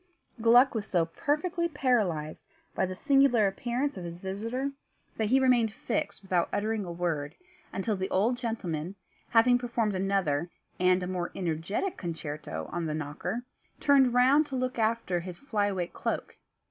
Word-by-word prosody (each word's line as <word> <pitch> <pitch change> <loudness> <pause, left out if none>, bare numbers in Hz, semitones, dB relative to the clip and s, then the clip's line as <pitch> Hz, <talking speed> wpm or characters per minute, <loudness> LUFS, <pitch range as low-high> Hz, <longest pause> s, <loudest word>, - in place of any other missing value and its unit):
Gluck 245 +4 +6
was 215 -2 -3
so 175 -3 +2
perfectly 305 - -1
paralysed 210 - 0 0.3
by 190 - 0
the 185 - -5
singular 270 -2 +4
appearance 240 +7 -1
of 180 - -6
his 170 0 -7
visitor 230 +9 -3 0.5
that 220 - +1
he 260 +5 +4
remained 245 -4 +3
fixed 205 - -3
without 180 -3 +1
uttering 215 0 -1
a 175 - -5
word, 165 -4 -2 0.4
until 205 +2 -1
the 190 0 -3
old 215 +6 +2
gentleman, 195 -8 -3 0.3
having 245 +2 +5
performed 235 -3 -1
another, 185 -5 0 0.3
and 180 0 +3
a - - -3
more 180 -1 -3
energetic 180 - -2
concerto 150 - -5
on 170 -1 -2
the 155 - -2
knocker, 155 +9 -4 0.4
turned 275 -3 +5
round 275 +5 +5
to 270 - -5
look 255 -1 -2
after 220 -5 +1
his 175 0 -7
fly 215 -8 0
away 190 -3 -1
cloak. - - -4
205 Hz, 160 wpm, -29 LUFS, 175-245 Hz, 0.5 s, Gluck